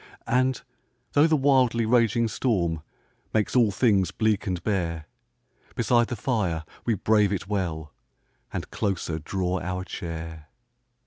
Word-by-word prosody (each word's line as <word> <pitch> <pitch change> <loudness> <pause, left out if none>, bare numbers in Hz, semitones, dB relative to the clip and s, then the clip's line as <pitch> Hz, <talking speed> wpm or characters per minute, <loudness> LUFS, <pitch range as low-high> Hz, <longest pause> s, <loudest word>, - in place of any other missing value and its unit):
And, 130 +1 +1 0.5
though 145 +2 +5
the 160 - +3
wildly 130 -4 +3
raging 115 0 +3
storm 90 -10 0 0.5
Makes 110 +2 +1
all 120 -4 +5
things 100 -2 +2
bleak 110 -3 0
and 90 -2 -2
bare, 85 -6 -1 0.7
Beside 120 -1 +3
the 120 - -3
fire 100 -9 -1 0.2
we 115 - +2
brave 105 0 +3
it 95 -2 -3
well, 85 -7 -3 0.6
And - - -5
closer 95 -6 -2
draw 90 +3 -2
our 90 +1 -3
chair. 80 -3 -6
100 Hz, 130 wpm, -26 LUFS, 85-115 Hz, 0.7 s, though